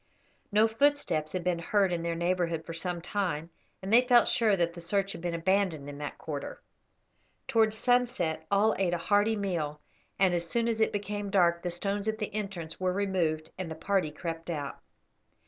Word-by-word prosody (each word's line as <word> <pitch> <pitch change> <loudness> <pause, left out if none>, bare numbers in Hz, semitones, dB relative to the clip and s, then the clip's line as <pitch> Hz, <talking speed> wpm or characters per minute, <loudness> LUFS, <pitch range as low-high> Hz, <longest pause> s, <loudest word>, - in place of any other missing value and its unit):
No 215 +2 +5
footsteps 225 - +1
had 185 -2 -2
been 180 -1 0
heard 195 +2 +2
in 170 -1 -1
their 170 0 -2
neighbourhood 170 -1 0
for 165 - -6
some 175 +1 -2
time, 175 -4 -2 0.3
and 195 +3 -2
they 240 - +8
felt 245 -1 +5
sure 215 -4 +3
that 170 -1 +1
the 170 - -9
search 195 +3 0
had 200 - -7
been 175 -1 -2
abandoned 170 -4 +1
in 145 0 -8
that 145 -1 -5
quarter. 145 -3 -6 0.9
Towards 220 -1 +3
sunset 235 -11 +1
all 205 +2 +3
ate 175 -2 +2
a 170 - -6
hearty 205 +2 +4
meal, 170 -8 -2 0.4
and 190 -2 +3
as 170 -1 -1
soon 235 +3 +1
as 225 -1 0
it 220 - +3
became 205 0 -3
dark 170 -3 +3
the 180 - -2
stones 200 +4 -2
at 220 0 0
the 210 -2 -4
entrance 195 -6 -5
were 185 0 +1
removed 180 -6 -1
and 185 -3 -3
the 160 - -5
party 190 -1 0
crept 165 +2 -6
out. 145 -4 -4
185 Hz, 195 wpm, -29 LUFS, 165-205 Hz, 0.9 s, they